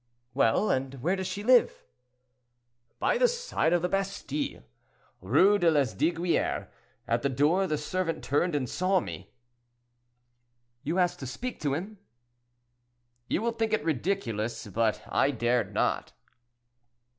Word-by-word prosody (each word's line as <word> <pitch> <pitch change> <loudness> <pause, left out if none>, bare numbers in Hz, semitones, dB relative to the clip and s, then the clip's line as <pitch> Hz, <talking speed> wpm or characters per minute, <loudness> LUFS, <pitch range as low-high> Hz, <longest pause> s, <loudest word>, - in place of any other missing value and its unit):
"Well, 135 - +2
and 135 +1 -1
where 180 +4 +2
does 190 -1 -3
she 205 - -5
live?" 250 +2 +4 1.1
"By - - +1
the - - +6
side 480 - -1
of 175 -1 +2
the - - +2
Bastille, 185 - -3 0.6
Rue 180 - +4
de 175 -2 +4
Lesdiguieres. 160 +4 0 0.4
At 115 +1 +1
the 140 - 0
door, 150 +9 +2
the 155 -3 0
servant 165 +3 -2
turned 150 +4 +1
and 135 -3 -1
saw 185 +7 +1
me." 90 - -8 1.5
"You 155 +5 -2
asked 180 -1 +1
to 130 - -6
speak 245 - -5
to 145 -2 0
him?" 195 +6 -6 1.3
"You 215 - -1
will 235 - +1
think 225 -1 -2
it 215 - 0
ridiculous, 120 - -2
but 110 +1 0
I 135 - +2
dared 120 -5 0
not." - - -1
165 Hz, 135 wpm, -28 LUFS, 130-195 Hz, 1.5 s, the